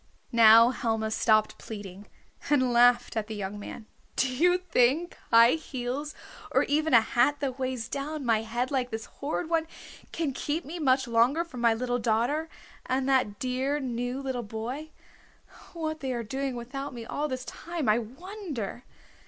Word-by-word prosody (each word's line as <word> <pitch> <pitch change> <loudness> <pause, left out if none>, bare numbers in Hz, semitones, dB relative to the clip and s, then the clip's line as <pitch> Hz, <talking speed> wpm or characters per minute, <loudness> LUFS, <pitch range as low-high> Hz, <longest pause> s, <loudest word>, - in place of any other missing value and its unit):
Now 230 +1 +8
Helma 225 -3 -1
stopped 215 -1 +2
pleading, 205 -2 -9 0.4
and 260 -4 +3
laughed 245 +1 +4
at 215 -1 -1
the 220 - -5
young 205 0 -5
man. 215 +2 -8 0.3
"Do 260 - +1
you 355 +7 +4
think 335 -1 +1
high 230 +1 +7
heels, 280 -1 -4 0.3
or - - +3
even 305 -1 +2
a 230 - +8
hat 245 +6 +2
that 270 -2 -3
weighs 255 -3 -2
down 285 +2 -4
my 225 -2 +3
head 240 +4 -2
like 255 -3 0
this 225 -1 -5
horrid 310 +4 -4
one 325 -1 0 0.4
can 315 -5 -2
keep 300 +5 -3
me 335 +5 -6
much 265 -3 +2
longer 240 +8 +3
from 300 -8 -9
my 230 -1 +4
little 245 +1 -1
daughter, 240 +8 0 0.4
and 260 +1 0
that 255 -7 +2
dear 260 +4 -1
new 245 -1 -3
little 260 -2 -2
boy? 235 +8 -5 0.8
What 315 -2 -3
they 265 -3 -3
are 235 -1 -3
doing 265 +3 -3
without 255 +3 -6
me 230 -1 -7
all 295 +6 -2
this 255 -2 -4
time 335 -5 -5
I 215 +2 +4
wonder!" 265 - -6
255 Hz, 170 wpm, -28 LUFS, 230-290 Hz, 0.8 s, Now